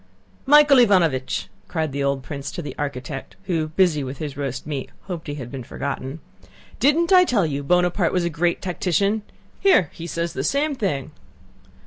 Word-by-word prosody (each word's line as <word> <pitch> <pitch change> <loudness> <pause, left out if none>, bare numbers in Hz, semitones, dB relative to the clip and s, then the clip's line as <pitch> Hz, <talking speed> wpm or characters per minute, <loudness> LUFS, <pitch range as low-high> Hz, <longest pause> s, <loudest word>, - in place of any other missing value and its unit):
"Michael 295 -1 +7
Ivánovich!" 175 - +3 0.2
cried 160 -4 -2
the 140 +1 -2
old 140 -1 0
prince 140 -1 -6
to 175 - -5
the 150 - -6
architect 140 -1 -5
who, 165 -5 -1
busy 160 -2 +2
with 130 +1 -6
his 145 -3 -5
roast 135 -2 -4
meat, 140 -3 -4
hoped 175 -4 -7
he 145 - -4
had 125 -4 -7
been 135 -2 -5
forgotten: 135 +3 -5 0.6
"Didn't 330 +6 +3
I 365 -1 +8
tell 230 - +2
you 145 -2 -2
Buonaparte 180 +3 +2
was 180 - +1
a - - +1
great 170 +3 0
tactician? 195 +4 0 0.4
Here, 285 - +4
he 170 - -7
says 170 0 -3
the - - -3
same 290 +2 +1
thing." 155 - -2
160 Hz, 175 wpm, -23 LUFS, 140-190 Hz, 0.6 s, I